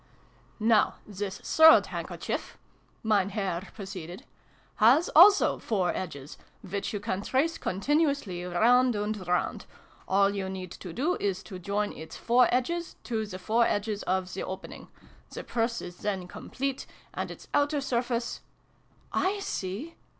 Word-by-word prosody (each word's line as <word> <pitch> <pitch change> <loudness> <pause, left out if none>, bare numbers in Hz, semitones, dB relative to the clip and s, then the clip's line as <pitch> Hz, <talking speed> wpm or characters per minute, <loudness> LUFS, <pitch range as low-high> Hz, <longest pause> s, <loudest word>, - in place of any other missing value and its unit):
" - - -32 0.2
Now, 210 - +3
this 200 -1 -5
third 320 0 +7
handkerchief," - - -5 0.5
Mem 205 -3 +2
Herr 195 -3 -3
proceeded, 190 -4 -8 0.3
" - - -33
has 290 +8 +5
also 395 +5 +7
four 190 -6 0
edges, 145 -6 -6 0.3
which 200 0 -3
you 205 - -3
can 200 -2 -3
trace 285 +9 0
continuously 280 - 0
round 235 +7 +3
and 210 -2 -3
round: 180 0 -1 0.4
all 195 +1 +3
you 195 -1 -3
need 185 -1 -6
do 260 - -2
is 195 -2 -1
to 185 -3 -8
join 205 +3 -1
its 160 +1 -9
four 245 +1 +4
edges 335 +8 -1
to 220 -3 -2
the 185 - -7
four 225 +5 +2
edges 205 0 -1
of 185 0 -1
the 190 - -4
opening. 190 - -7 0.4
The - - -7
Purse 230 0 -1
is 175 0 -8
then 190 -3 -3
complete, 270 +7 -4 0.3
and - - -3
its - - -10
outer 290 +1 +2
surface 240 -3 -2 0.5
"/ 385 +3 -2
see!" 230 - -5
205 Hz, 145 wpm, -28 LUFS, 185-250 Hz, 0.5 s, third